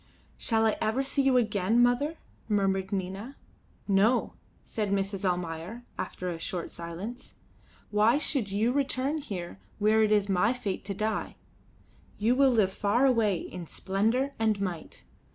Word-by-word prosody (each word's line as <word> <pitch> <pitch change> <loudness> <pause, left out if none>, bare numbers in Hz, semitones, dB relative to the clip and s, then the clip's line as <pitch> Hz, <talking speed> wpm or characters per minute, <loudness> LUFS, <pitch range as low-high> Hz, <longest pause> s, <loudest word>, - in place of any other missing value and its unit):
"Shall 225 -1 +1
I 220 - +2
ever 220 +5 +1
see 275 +1 0
you 270 -2 +4
again, 215 -1 +2
mother?" 245 +6 +2 0.3
murmured 195 -2 +1
Nina. 195 +7 -4 0.5
"No," 205 +5 +3 0.3
said 210 -2 -2
Mrs. 195 0 -1
Almayer, 180 +4 -2
after 180 - -5
a 170 -2 -3
short 175 0 -4
silence. 170 +8 -7 0.6
"Why 215 +5 +4
should 270 -8 0
you 210 +5 +1
return 280 +2 0
here 180 - -6 0.2
where 215 +1 +3
it 215 -1 +3
is 205 -1 +3
my 200 +4 +2
fate 205 -7 -4
to 200 -1 -4
die? 215 +2 -2 0.8
You 225 +4 +2
will 275 0 +5
live 215 -6 +2
far 210 +8 +2
away 225 -7 +3
in 175 -2 -7
splendour 225 - 0
and 220 -2 +2
might. 180 -5 -5
210 Hz, 150 wpm, -28 LUFS, 195-245 Hz, 0.8 s, will